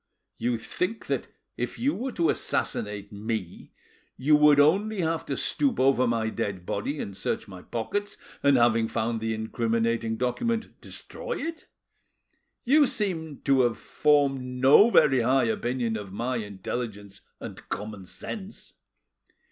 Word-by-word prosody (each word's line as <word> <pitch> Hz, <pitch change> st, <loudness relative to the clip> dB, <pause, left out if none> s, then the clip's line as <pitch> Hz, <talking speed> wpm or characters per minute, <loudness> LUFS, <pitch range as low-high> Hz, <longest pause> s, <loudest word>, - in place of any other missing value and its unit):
you 120 Hz, +1 st, 0 dB
think 180 Hz, -, -3 dB
that -, -, -2 dB, 0.3 s
if -, -, -3 dB
you 275 Hz, +5 st, +1 dB
were 260 Hz, +2 st, -3 dB
to 170 Hz, -6 st, +2 dB
assassinate 105 Hz, -1 st, -2 dB
me 105 Hz, -3 st, -5 dB, 0.5 s
you 150 Hz, +4 st, +4 dB
would 150 Hz, -1 st, +6 dB
only 195 Hz, +7 st, +3 dB
have 165 Hz, 0 st, -1 dB
to 140 Hz, -, -2 dB
stoop 275 Hz, -5 st, 0 dB
over 130 Hz, -1 st, +4 dB
my 115 Hz, -1 st, 0 dB
dead 100 Hz, -5 st, -3 dB
body 140 Hz, +12 st, -3 dB
and 100 Hz, -, -5 dB
search -, -, -3 dB
my 95 Hz, -2 st, -10 dB
pockets, 205 Hz, -, -3 dB, 0.2 s
and, 140 Hz, -2 st, +5 dB
having 115 Hz, -1 st, +3 dB
found 115 Hz, 0 st, -2 dB
the 110 Hz, 0 st, -1 dB
incriminating 115 Hz, 0 st, -1 dB
document, 225 Hz, -, -1 dB
destroy -, -, -6 dB
it. 330 Hz, 0 st, -5 dB, 1.0 s
You 285 Hz, +3 st, +5 dB
seem 165 Hz, -, -2 dB
to 135 Hz, -2 st, +3 dB
have 120 Hz, -2 st, +1 dB
formed 145 Hz, -3 st, +2 dB
no 130 Hz, -, +5 dB
very 135 Hz, -, +5 dB
high 130 Hz, +3 st, +3 dB
opinion 120 Hz, +1 st, -1 dB
of 105 Hz, -3 st, -6 dB
my 120 Hz, +5 st, -2 dB
intelligence 100 Hz, -1 st, -5 dB, 0.2 s
and -, -, -9 dB
common 105 Hz, -2 st, -5 dB
sense. 200 Hz, -, -8 dB
125 Hz, 140 wpm, -27 LUFS, 110-160 Hz, 1.0 s, would